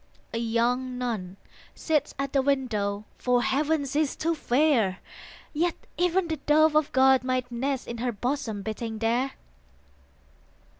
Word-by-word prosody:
A 230 - -1
young 245 +2 0
nun 210 -7 -3 0.4
sits 300 -3 0
at 275 +1 -3
the 275 - +4
window; 215 -7 0
For 245 -1 +2
Heaven 295 +2 +1
she 280 +2 -1
is 305 -3 0
too 330 +2 0
fair; 250 - +2 0.6
Yet 335 +3 +1 0.2
even 360 +1 +1
the 320 -1 -2
Dove 305 +2 +4
of 305 -1 +3
God 265 0 +5
might 255 -1 -1
nest 265 +2 -2
In 235 -1 -5
her 245 +1 0
bosom 230 -2 -3
beating 220 +1 -4
there. 235 +4 0
255 Hz, 145 wpm, -27 LUFS, 235-295 Hz, 0.6 s, God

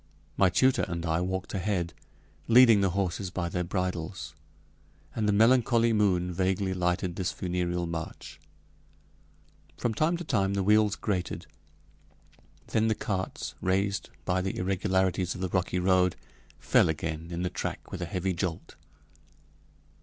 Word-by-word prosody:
My 95 - +4
tutor 130 +8 +3
and 85 0 -4
I 80 +1 +1
walked 95 +1 -3
ahead, 95 -3 -1 0.5
leading 115 -3 +7
the 95 - +3
horses 95 0 -1
by 90 -1 -3
their 90 0 -1
bridles, 85 -3 -3 0.8
and 105 -2 0
the - - +5
melancholy 115 +1 +4
moon 90 -4 +2
vaguely 95 +1 0
lighted 90 -1 -1
this 95 -2 -1
funereal 90 -1 -2
march. 85 -1 -6 1.4
From 120 - -1
time 155 +9 +1
to 175 - -6
time 100 - 0
the 100 - 0
wheels 105 +1 +4
grated. 90 -5 -3 1.2
Then 110 0 +2
the 110 - +2
carts, 95 -3 -3
raised 95 +2 0 0.2
by 90 0 +1
the 95 +1 -3
irregularities 95 -1 0
of 95 - -7
the 95 - -1
rocky 90 +1 0
road, 90 -1 +3 0.4
fell - - +3
again 80 +1 -3
in 85 +1 -3
the 90 - -1
track - - -5
with - - -5
a - - -1
heavy 95 +2 -2
jolt. 85 -1 -4
95 Hz, 145 wpm, -28 LUFS, 90-100 Hz, 1.4 s, leading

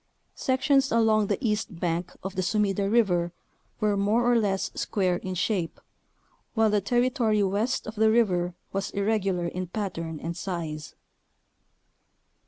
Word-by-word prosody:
Sections 270 +1 +2
along 220 -2 +3
the - - 0
east 210 -4 -2
bank 170 0 -1
of 190 0 -4
the 185 - 0
Sumida 200 0 +1
River 180 -7 +2 0.5
were 210 -1 +2
(more 205 +4 +2
or - - +4
less) 200 -4 +1
square 185 -4 0
in 185 +1 -5
shape, 180 -2 -1 0.8
while 220 -1 +3
the 210 -1 +2
territory 240 -1 +2
west 205 +6 0
of 215 - -6
the 220 0 +3
river 180 -6 +2 0.2
was 195 0 -1
irregular 195 -3 0
in 180 +1 -3
pattern 165 -5 -4
and 170 +2 -4
size. 165 -5 -5
200 Hz, 140 wpm, -27 LUFS, 180-220 Hz, 0.8 s, or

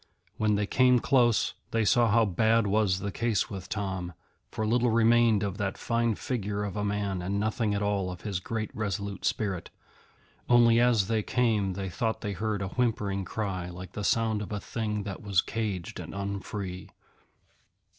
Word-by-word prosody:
When 110 -1 +2
they 105 0 +1
came 125 +3 +4
close, 120 -3 +3 0.2
they 115 -1 +1
saw 120 +1 +4
how 115 +1 +4
bad 110 +4 +2
was 100 -2 +2
the 100 - -3
case 115 -2 0
with 95 -2 -7
Tom, 95 -4 -3 0.4
for 110 - -3
little 120 +2 +2
remained 115 -1 +4
of 100 -1 -3
that 100 -2 -2
fine 115 -1 0
figure 105 -4 -3
of 100 -1 -4
a 105 - -1
man 100 -2 -1
and 95 +3 -1
nothing 110 0 0
at 100 - -1
all 100 -2 0
of 90 -1 -7
his 100 -4 -3
great 110 +3 -4
resolute 100 -3 -3
spirit, 95 -5 -1 0.8
only 120 -1 +6
as 120 -5 +3
they 110 -1 +1
came 105 -5 +1
they 95 +1 -4
thought 110 +4 -2
they 105 -1 -3
heard 105 +1 -2
a 95 - -3
whimpering 105 -5 -1
cry 95 -4 -3
like 90 0 -9
the 105 - -5
sound 110 0 +1
of 105 - -6
a 105 - -2
thing 105 -1 -3
that 95 -2 -6
was 100 -4 +1
caged 100 -3 -3
and - - -7
unfree. 100 -1 -5
105 Hz, 180 wpm, -28 LUFS, 95-115 Hz, 0.8 s, only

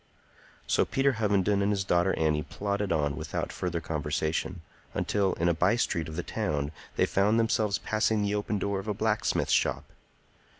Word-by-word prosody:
So - - +3
Peter 135 +1 +2
Hovenden 100 -2 +2
and 100 +1 +2
his 100 -2 0
daughter 90 0 +2
Annie 75 -1 +2
plodded 100 +5 -3
on 75 -3 +1
without - - -3
further 85 -2 -2
conversation, 80 +2 -2 0.3
until 100 -2 +1
in 85 - 0
a 85 - +4
by 90 +6 +3
street 85 -8 0
of 80 - -7
the 90 - -2
town 75 -2 -2 0.2
they - - +3
found 105 +4 +2
themselves 110 -3 +1
passing 110 +1 +1
the 100 0 0
open 105 0 -1
door 100 0 -1
of 95 - -8
a 105 - -1
blacksmith's 110 +1 0
shop. - - +2
95 Hz, 175 wpm, -28 LUFS, 80-105 Hz, 0.3 s, a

